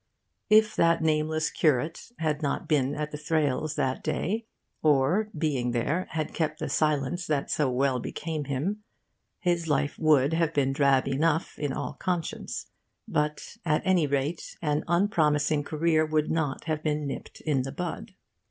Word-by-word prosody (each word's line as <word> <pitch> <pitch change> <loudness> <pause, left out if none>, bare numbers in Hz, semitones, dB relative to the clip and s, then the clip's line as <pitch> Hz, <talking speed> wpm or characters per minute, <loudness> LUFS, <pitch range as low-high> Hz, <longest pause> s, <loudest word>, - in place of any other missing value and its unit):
If 215 0 +5
that 165 -1 +3
nameless 155 0 +1
curate 155 - 0
had 155 -1 -1
not 140 -2 -2
been 145 -2 +2
at 150 0 -3
the 150 - -6
Thrales' 150 -1 0
that 130 0 -1
day, 220 +6 -1 0.3
or, 155 +8 +3
being 135 -6 0
there, 155 +10 0
had 155 -1 -3
kept 155 -2 -1
the - - -3
silence 155 +3 0
that 145 -3 -1
so 150 -3 +2
well 130 0 +1
became 155 +4 -4
him, 150 +11 -2 0.6
his 175 -3 0
life 145 -1 0
would 150 -2 +4
have 165 -1 +1
been 135 -2 +2
drab 135 -2 +3
enough, 155 +4 +1
in 145 -2 -1
all - - -3
conscience. 180 -4 -3 0.4
But 150 +9 -2
at 150 -2 +1
any 180 -5 +3
rate 140 +4 -2
an 150 -1 0
unpromising 155 -5 +2
career 155 +1 +2
would 155 -1 0
not 150 -4 -1
have 155 -1 -2
been 150 -1 -1
nipped 140 - -6
in 145 -4 +1
the 135 +1 -4
bud. 180 +6 -5
155 Hz, 160 wpm, -27 LUFS, 140-165 Hz, 0.6 s, If